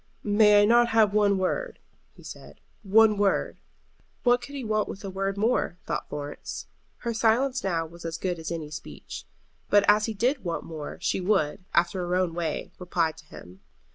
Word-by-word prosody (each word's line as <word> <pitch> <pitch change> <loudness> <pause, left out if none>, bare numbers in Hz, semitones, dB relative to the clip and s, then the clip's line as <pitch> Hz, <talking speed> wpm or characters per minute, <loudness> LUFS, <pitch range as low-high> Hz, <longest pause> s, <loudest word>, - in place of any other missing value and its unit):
"May 210 0 +5
I - - +5
not 235 +2 +5
have 220 -3 +3
one 205 -2 +3
word," - - -2 0.4
he - - -16
said, - - -11 0.2
"one 215 +1 +4
word?" 200 -1 +1 0.6
What 245 0 +4
could 280 +3 -9
he 270 - -4
want 215 -1 0
with 195 - -8
a 195 - -5
word 195 +1 -2
more? 215 -4 0
thought - - -3
Florence. 145 0 -6 0.4
Her 235 -1 -2
silence 245 +4 +2
now 170 -4 0
was 170 +1 -13
as 165 0 -4
good 180 -1 -3
as 160 - -5
any 160 -3 -5
speech. 75 - -8 0.4
But 205 0 +5
as 210 +1 +5
he 220 - -4
did 250 +6 0
want 170 -2 -3
more 155 -3 -7
she - - 0
would, 185 -1 0
after 175 +2 +2
her 180 0 -1
own 180 -2 +1
way, 165 -2 -3
reply 175 -3 0
to 155 - -17
him. 90 -10 -13
195 Hz, 190 wpm, -26 LUFS, 170-220 Hz, 0.6 s, May